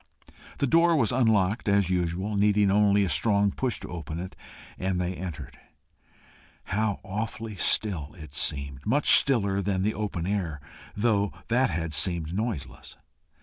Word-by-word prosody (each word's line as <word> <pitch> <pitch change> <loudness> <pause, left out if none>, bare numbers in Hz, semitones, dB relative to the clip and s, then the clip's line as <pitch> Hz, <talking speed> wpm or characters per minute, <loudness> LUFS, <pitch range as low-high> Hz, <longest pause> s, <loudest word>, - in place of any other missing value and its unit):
The - - 0
door 165 +4 +3
was 125 -7 +1
unlocked 110 -4 +1
as 100 -2 +2
usual, 90 +3 -2
needing 100 0 +2
only 100 0 +3
a - - -2
strong 100 -1 +2
push 130 +2 -3
to - - -8
open 80 -2 -6
it, 95 +1 -7 0.4
and 95 -1 -2
they 90 +1 -2
entered. 90 -3 -8 1.0
How 105 +1 -2
awfully 110 +2 -5
still 90 -6 +1
it 75 -4 -12
seemed! 70 -1 -1
much 140 +7 +3
stiller 100 -7 +4
than 95 -1 -1
the 105 +2 0
open 100 -6 -4
air, 90 -6 -3 0.4
though 105 -2 +1 0.2
that 125 +3 +2
had 80 -1 -3
seemed 80 +2 +4
noiseless. 90 - -5
100 Hz, 145 wpm, -26 LUFS, 85-110 Hz, 1.0 s, stiller